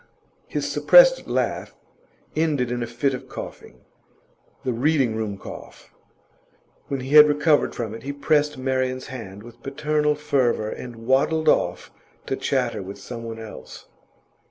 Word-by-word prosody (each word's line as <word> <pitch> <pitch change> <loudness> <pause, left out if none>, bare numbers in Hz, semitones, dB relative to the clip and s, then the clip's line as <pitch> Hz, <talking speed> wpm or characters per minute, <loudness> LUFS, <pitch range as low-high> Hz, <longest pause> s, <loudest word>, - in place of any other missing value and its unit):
His - - -2
suppressed - - +6
laugh - - -2 0.6
ended 150 -6 0
in 120 0 -2
a 120 - -2
fit 120 +4 -1
of 130 - -7
coughing - - -9 0.8
the 130 - -1
Reading 130 -2 +1
room 110 -3 -3
cough. - - -11 0.9
When 135 -2 -3
he 130 +2 -6
had 150 0 +9
recovered 150 +1 +2
from 110 -3 -4
it, 115 - -8
he 140 - -4
pressed 150 0 +1
Marian's 130 0 -1
hand 100 -5 -8
with 120 0 -14
paternal 150 +2 0
fervour, 130 -7 0
and 115 -2 -8
waddled 155 +5 +2
off - - +1 0.3
to - - -2
chatter - - -1
with 95 +1 -8
someone 115 -2 -7
else. 110 -1 -10
130 Hz, 140 wpm, -23 LUFS, 115-150 Hz, 0.9 s, had